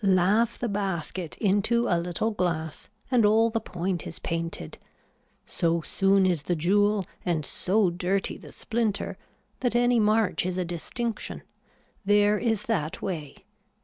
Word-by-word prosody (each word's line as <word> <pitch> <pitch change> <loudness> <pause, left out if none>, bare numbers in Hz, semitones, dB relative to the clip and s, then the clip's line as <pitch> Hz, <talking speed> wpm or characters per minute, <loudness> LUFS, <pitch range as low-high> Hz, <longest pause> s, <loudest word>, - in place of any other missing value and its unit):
Laugh 200 +5 +3
the 240 - -2
basket 190 -4 -3
into 220 +4 +2
a - - +2
little 180 +6 -1
glass 165 -6 -2 0.2
and 245 -3 +4
all 220 +2 +4
the 225 - 0
point 180 -3 -3
is - - -6
painted. 165 - -4 0.7
So 170 0 0
soon 195 +3 +2
is 175 -5 +1
the 175 +4 -1
jewel 205 +4 +2 0.2
and 165 -4 0
so 190 +3 +1
dirty 180 +3 -1
the - - -12
splinter 225 -3 -2 0.4
that 245 -2 0
any 245 0 +4
march 210 -5 +2
is 180 0 -2
a 180 - 0
distinction. 215 +7 -3 0.6
There 205 +1 +4
is 225 -3 0
that 165 -9 -2
way. 155 -7 -5
195 Hz, 145 wpm, -27 LUFS, 175-220 Hz, 0.7 s, and